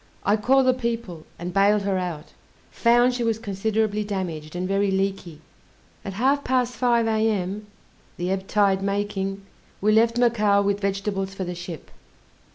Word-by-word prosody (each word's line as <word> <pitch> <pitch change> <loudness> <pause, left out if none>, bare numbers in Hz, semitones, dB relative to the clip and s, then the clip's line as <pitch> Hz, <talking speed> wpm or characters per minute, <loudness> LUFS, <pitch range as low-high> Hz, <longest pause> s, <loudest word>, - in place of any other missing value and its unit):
I 205 - +4
called 260 +5 +3
the 255 - +4
people, 230 -9 -4
and 175 +1 -6
baled 200 +1 +3
her 195 -1 0
out; 170 -4 -5 0.4
found 240 +1 +3
she 245 -1 -2
was 225 -2 +1
considerably 215 0 -1
damaged, 175 -6 -5
and 180 +1 -2
very 195 +1 +1
leaky. 190 -5 -2 0.6
At 195 - -5
half 270 +7 +1
past 250 -1 +1
5 235 0 +2
A.M., 210 -2 -1 0.5
the 180 +1 -2
ebb 195 0 -2
tide 200 -2 +2
making, 195 -1 -2 0.3
we 210 +2 +2
left 230 +2 +3
Macao 215 -4 +3
with 200 0 0
vegetables 195 -1 -2
for 195 - -3
the 180 -1 -4
ship. 175 -2 -8
200 Hz, 160 wpm, -24 LUFS, 190-225 Hz, 0.6 s, I